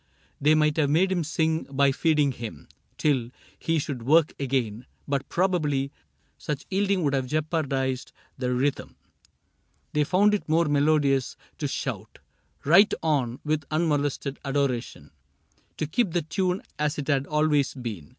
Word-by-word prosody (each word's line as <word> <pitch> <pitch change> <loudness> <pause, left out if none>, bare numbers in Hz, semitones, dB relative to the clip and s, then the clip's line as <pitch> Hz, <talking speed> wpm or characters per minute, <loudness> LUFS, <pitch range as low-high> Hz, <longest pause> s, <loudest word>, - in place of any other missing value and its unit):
They 150 +2 +5
might 150 0 +2
have 145 -3 +2
made 180 +6 +3
him 175 -3 +1
sing 160 +1 0
by 140 0 +2
feeding 150 0 +2
him 115 - -8 0.3
Till 130 -6 +1 0.3
he 165 0 0
should 140 -4 -3
work 155 +6 +4
again, 125 -4 -2 0.2
but 140 -2 -2
probably 150 -7 0 0.5
Such 150 -2 -4
yielding 195 -1 +1
would 140 -2 +1
have 135 -2 0
jeopardized 140 -4 -1 0.2
the 125 -1 -2
rhythm; 130 +3 -1 1.0
They 150 - +3
found 195 +7 +3
it 205 - -2
more 165 +2 +3
melodious 145 -3 +2 0.2
to - - -1
shout - - -5 0.5
Right 190 +8 +6
on, 135 -7 0
with 155 0 0
unmolested 145 -3 -1
adoration, 135 - -2 0.7
To 155 - -1
keep 180 +4 0
the 175 - +1
tune 180 +4 -1 0.2
as 150 0 0
it 145 - -4
had 140 -2 +1
always 150 -3 +1
been. 110 - -6
145 Hz, 145 wpm, -26 LUFS, 135-160 Hz, 1.0 s, Right